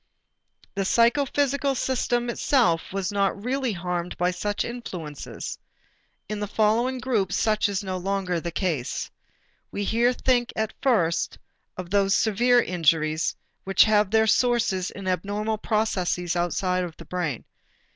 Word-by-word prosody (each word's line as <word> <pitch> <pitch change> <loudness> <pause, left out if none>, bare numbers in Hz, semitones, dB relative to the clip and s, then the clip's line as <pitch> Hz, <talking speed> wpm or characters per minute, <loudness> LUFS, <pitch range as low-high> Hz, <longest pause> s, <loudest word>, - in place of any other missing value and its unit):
The 195 - -1
psychophysical 275 +5 +2
system 240 -1 0
itself 230 - +1
was 195 +1 -2
not 200 0 0
really 260 -1 0
harmed 180 -1 -3
by 180 +1 +1
such 205 +3 -2
influences. 180 - -6 0.7
In 210 0 -4
the 205 - -2
following 225 +5 +1
groups, 215 -7 0
such 215 -1 +2
is 200 0 -2
no 185 -1 -3
longer 185 -1 -1
the 170 - -4
case. 165 -7 -2 0.6
We 205 - -3
here 235 +4 +2
think 245 -1 +1
at 220 0 -2
first 175 -11 +1 0.4
of 180 -1 -7
those 200 -1 +3
severe 240 +3 +3
injuries 160 -2 +1 0.3
which 195 0 +5
have 210 -2 +3
their 220 +1 +4
sources 225 -5 +2
in 195 -1 -8
abnormal 205 +4 -1
processes 185 -6 0
outside 180 +1 0
of 170 -3 -7
the - - -11
brain. 170 -9 -3
200 Hz, 135 wpm, -25 LUFS, 180-235 Hz, 0.7 s, which